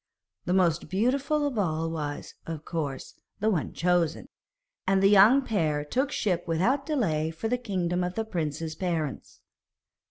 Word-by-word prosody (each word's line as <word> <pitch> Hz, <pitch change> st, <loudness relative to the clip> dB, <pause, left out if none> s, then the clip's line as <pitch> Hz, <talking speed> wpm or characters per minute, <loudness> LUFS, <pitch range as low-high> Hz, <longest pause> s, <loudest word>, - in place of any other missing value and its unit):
The 180 Hz, -, 0 dB
most 170 Hz, -3 st, +2 dB
beautiful 275 Hz, +9 st, +1 dB
of 265 Hz, -6 st, -1 dB
all 165 Hz, -4 st, 0 dB
was, 150 Hz, -3 st, -5 dB
of 160 Hz, -2 st, -6 dB
course, 145 Hz, -6 st, -4 dB, 0.3 s
the 220 Hz, +2 st, +2 dB
one 170 Hz, -7 st, -1 dB
chosen, 175 Hz, -, 0 dB, 0.6 s
and 190 Hz, 0 st, +3 dB
the -, -, +7 dB
young 215 Hz, +8 st, +7 dB
pair 155 Hz, -, 0 dB
took 265 Hz, -, 0 dB
ship 180 Hz, -8 st, -1 dB
without 235 Hz, -, +1 dB
delay 165 Hz, -, 0 dB
for 165 Hz, +7 st, -4 dB
the 250 Hz, +2 st, 0 dB
kingdom 180 Hz, -6 st, -1 dB
of 180 Hz, 0 st, -3 dB
the 225 Hz, -, -1 dB
prince's 160 Hz, -5 st, -3 dB
parents. 160 Hz, -, -3 dB
180 Hz, 155 wpm, -27 LUFS, 160-220 Hz, 0.6 s, the